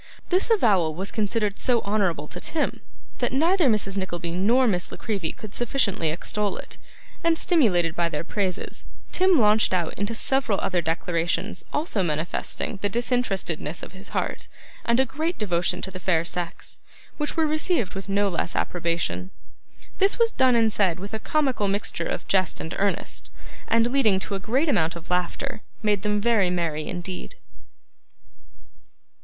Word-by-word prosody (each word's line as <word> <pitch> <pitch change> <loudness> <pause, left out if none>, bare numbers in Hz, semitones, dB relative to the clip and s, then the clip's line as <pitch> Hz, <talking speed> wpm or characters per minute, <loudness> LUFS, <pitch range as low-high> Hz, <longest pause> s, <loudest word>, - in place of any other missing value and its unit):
This 370 +5 +2
avowal 195 - +3
was 190 +3 -3
considered 210 -1 -1
so 240 -3 +2
honourable 195 -7 0
to - - -5
Tim, 315 -3 -1 0.4
that 245 - +1
neither 330 +5 +3
Mrs. 200 -3 +1
Nickleby 175 -3 -3
nor 220 +9 +3
Miss 180 -5 0
La - - -7
Creevy 195 -8 -2
could 215 -2 -10
sufficiently 225 - +1
extol 205 +6 -1
it; - - -9 0.4
and 335 -1 +3
stimulated 180 - +3
by 170 -1 +1
their 150 0 -3
praises, 190 -1 -3 0.2
Tim 370 -4 +4
launched 210 -3 +4
out 170 -3 0
into 205 +4 -2
several 245 -4 +1
other 180 -2 0
declarations 170 +4 -1
also 295 - 0
manifesting 165 +5 -2
the 205 - +1
disinterestedness 195 - -1
of - - -7
his 190 +1 -10
heart, - - -2 0.4
and 235 +1 +3
a 265 - +5
great 315 +8 -2
devotion 175 -4 0
to 190 - -4
the 185 - -7
fair 170 -3 +1
sex: 175 -1 -4 0.4
which 300 +2 -2
were 320 - +4
received 310 - +1
with 195 0 -6
no 200 +1 +2
less 170 -2 -2
approbation. 170 +1 -1 0.7
This 390 0 +4
was 465 -1 +4
done 260 - +4
and 225 -2 +3
said 185 -5 +2
with 200 +3 -7
a 220 - -2
comical 265 -5 +1
mixture 200 +1 -1
of - - -4
jest 185 -4 +2
and 160 - -5
earnest, 200 0 -1 0.4
and, 230 +1 +3
leading 225 -8 +4
to 200 - -2
a 195 - -1
great 255 +11 +1
amount 165 - +2
of 170 +1 -9
laughter, 210 +7 -1 0.2
made 205 -2 +2
them 210 0 +1
very 210 -4 +3
merry 165 -4 -1
indeed. 185 - -5
205 Hz, 165 wpm, -25 LUFS, 180-245 Hz, 0.7 s, a